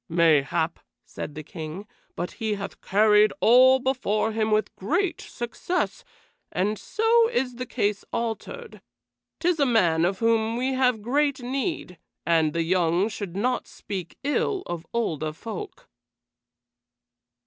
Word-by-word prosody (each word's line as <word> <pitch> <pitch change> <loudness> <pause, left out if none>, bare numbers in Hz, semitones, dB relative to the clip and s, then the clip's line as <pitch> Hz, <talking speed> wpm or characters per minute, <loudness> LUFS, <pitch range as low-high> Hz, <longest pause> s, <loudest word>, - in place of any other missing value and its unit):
"Mayhap," 165 0 +2 0.3
said 145 - -7
the 155 - -6
King, 160 +5 -7 0.3
"but 175 - -3
he 215 -1 0
hath 200 -1 -7
carried 210 +1 +4
all 255 +3 +7
before 245 -5 0
him 220 0 0
with 215 -1 +1
great 340 - -1
success, 350 - -3 0.5
and 205 +3 -1
so 455 +1 +3
is 260 - -1
the 255 0 -5
case 205 -4 -1
altered. 235 - -4 0.6
'Tis 350 -2 +1
a 285 - +4
man 175 -9 +3
of 185 +2 +1
whom 225 0 +1
we 260 +2 0
have 250 -4 +1
great 280 +2 +1
need, 260 - -3 0.3
and 160 -3 +2
the 165 - 0
young 175 +3 +2
should 200 -5 -6
not 245 +5 0
speak 185 -4 -7
ill 370 +7 0
of 170 -1 -6
older 160 -10 -1
folk." 210 +4 -8
220 Hz, 135 wpm, -25 LUFS, 180-260 Hz, 0.6 s, all